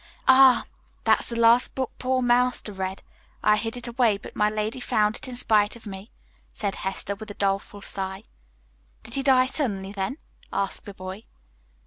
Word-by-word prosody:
"Ah, 260 -2 +7 0.4
that's - - +3
the 235 - -4
last 230 +1 +4
book 260 -1 -2
poor 255 0 +1
Master 245 -3 +2
read. 190 0 -4 0.4
I 210 - +5
hid 225 +2 -3
it 245 - -8
away, 235 -3 +2
but 200 - -12
my 210 0 +3
lady 215 +3 -2
found 215 -3 +1
it - - -9
in 255 - -6
spite 215 -4 +2
of 235 - -14
me," 195 +1 -8 0.4
said 200 -2 -2
Hester, 190 +1 -3
with 215 +2 -9
a 205 - -7
doleful 200 0 -1
sigh. 190 0 -4 0.8
"Did 225 +1 -12
he 275 - -1
die 260 -2 +5
suddenly, 205 -9 -2
then?" 205 +8 -3 0.3
asked 195 - -2
the 200 - -9
boy. 185 +2 -7
215 Hz, 175 wpm, -25 LUFS, 200-245 Hz, 0.8 s, Ah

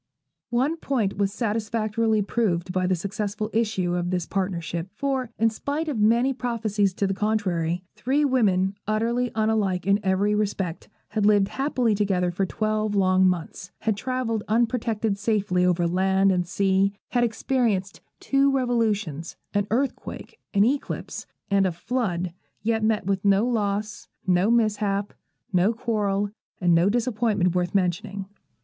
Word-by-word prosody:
One 260 +7 +1
point 230 - -1
was 200 -1 +2
satisfactorily 220 0 0
proved 190 -5 0
by 185 -1 +1
the 185 - +2
successful 205 +3 -3
issue 215 -6 0
of 175 0 -1
this 180 -2 -1
partnership; 175 -3 -2
for, 270 -3 -1
in 225 0 +3
spite 290 +8 -3
of 280 -8 -2
many 235 +5 +3
prophecies 220 -6 -1
to 200 - 0
the 195 - 0
contrary, 185 -5 0
three 280 +4 +1
women, 200 -8 +2
utterly 235 +3 0
unlike 215 -5 +1
in 200 +1 +3
every 195 +2 +1
respect, 195 -5 -2 0.2
had 210 0 +1
lived 205 -2 +4
happily 260 -5 0
together 195 -3 +1
for 190 +2 -1
twelve 215 +1 -1
long 185 -1 +4
months, 180 0 -4
had 220 -2 +1
travelled 230 -1 -2
unprotected 225 -2 0
safely 205 -4 +1
over 180 -1 +2
land 190 +2 +3
and 180 -2 0
sea, 195 +1 +2 0.2
had 245 -1 +2
experienced 225 -4 0 0.2
two 275 0 +2
revolutions, 215 - -1 0.2
an 205 0 +1
earthquake, 270 - -3 0.2
an 200 - +6
eclipse, 270 +5 -2 0.2
and 195 -1 +4
a - - 0
flood, 180 -3 -2 0.3
yet 225 0 +1
met 215 -4 +1
with 195 -1 -1
no 200 +2 +4
loss, 210 -3 -2 0.2
no 185 +2 +3
mishap, 210 -3 +1 0.4
no 185 +4 +4
quarrel, 205 -3 -1 0.3
and 175 -2 +3
no 170 +3 +4
disappointment 220 -5 +1
worth 180 +1 -1
mentioning. 190 +1 -1
205 Hz, 145 wpm, -25 LUFS, 190-230 Hz, 0.4 s, an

